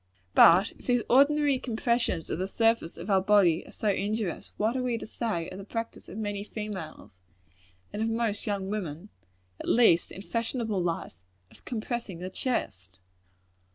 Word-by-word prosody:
But 180 Hz, +5 st, +7 dB
if -, -, -16 dB
these 245 Hz, -2 st, +2 dB
ordinary 285 Hz, +1 st, +4 dB
compressions 235 Hz, -6 st, -1 dB
of -, -, -2 dB
the 185 Hz, -, -1 dB
surface 225 Hz, -4 st, +1 dB
of 200 Hz, -, -4 dB
our 190 Hz, -1 st, +4 dB
bodies 190 Hz, -4 st, +3 dB
are -, -, -12 dB
so 215 Hz, -, -1 dB
injurious, 205 Hz, -1 st, -2 dB
what 220 Hz, +4 st, +1 dB
are 260 Hz, -, 0 dB
we 245 Hz, -2 st, 0 dB
to -, -, -7 dB
say 215 Hz, -8 st, -3 dB
of 185 Hz, -, -8 dB
the -, -, -7 dB
practice 230 Hz, +3 st, -6 dB
of 195 Hz, -, -8 dB
many 205 Hz, -2 st, -3 dB
females, 195 Hz, -, -7 dB, 0.7 s
and 210 Hz, -, -3 dB
of 225 Hz, -, +1 dB
most 225 Hz, -2 st, -1 dB
young 200 Hz, -1 st, -2 dB
women 185 Hz, -2 st, -4 dB, 0.5 s
at -, -, -4 dB
least 220 Hz, -8 st, +4 dB
in 195 Hz, -, -8 dB
fashionable 230 Hz, -3 st, -2 dB
life 170 Hz, -1 st, -2 dB, 0.4 s
of -, -, -20 dB
compressing 235 Hz, -4 st, -3 dB
the 180 Hz, +2 st, -6 dB
chest? 95 Hz, -, -2 dB
210 Hz, 170 wpm, -28 LUFS, 185-230 Hz, 0.7 s, But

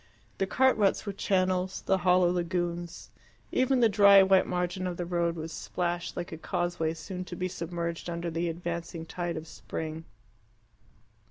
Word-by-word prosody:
The 195 Hz, -, +1 dB
cart 260 Hz, +5 st, +4 dB
ruts 205 Hz, -1 st, +2 dB
were 200 Hz, -, -3 dB
channels, 185 Hz, -1 st, 0 dB
the 190 Hz, -, +2 dB
hollow 180 Hz, -1 st, +4 dB
lagoons; 175 Hz, -1 st, -3 dB, 0.4 s
even 260 Hz, 0 st, +2 dB
the 230 Hz, -, +7 dB
dry 200 Hz, -2 st, +7 dB
white 190 Hz, 0 st, +4 dB
margin 180 Hz, +1 st, -1 dB
of 175 Hz, -1 st, -4 dB
the 175 Hz, -, -3 dB
road 170 Hz, -1 st, 0 dB
was 160 Hz, 0 st, -6 dB
splashed, 175 Hz, -1 st, -3 dB
like 175 Hz, -1 st, -4 dB
a 160 Hz, -, -7 dB
causeway 175 Hz, -2 st, -1 dB
soon 180 Hz, +3 st, -6 dB
to 180 Hz, -, -7 dB
be 185 Hz, +1 st, -2 dB
submerged 170 Hz, -1 st, -4 dB
under 170 Hz, 0 st, -3 dB
the 170 Hz, +1 st, -1 dB
advancing 170 Hz, 0 st, -5 dB
tide 175 Hz, 0 st, -3 dB
of 160 Hz, +1 st, -7 dB
spring. 160 Hz, 0 st, -6 dB
175 Hz, 165 wpm, -29 LUFS, 170-185 Hz, 0.4 s, the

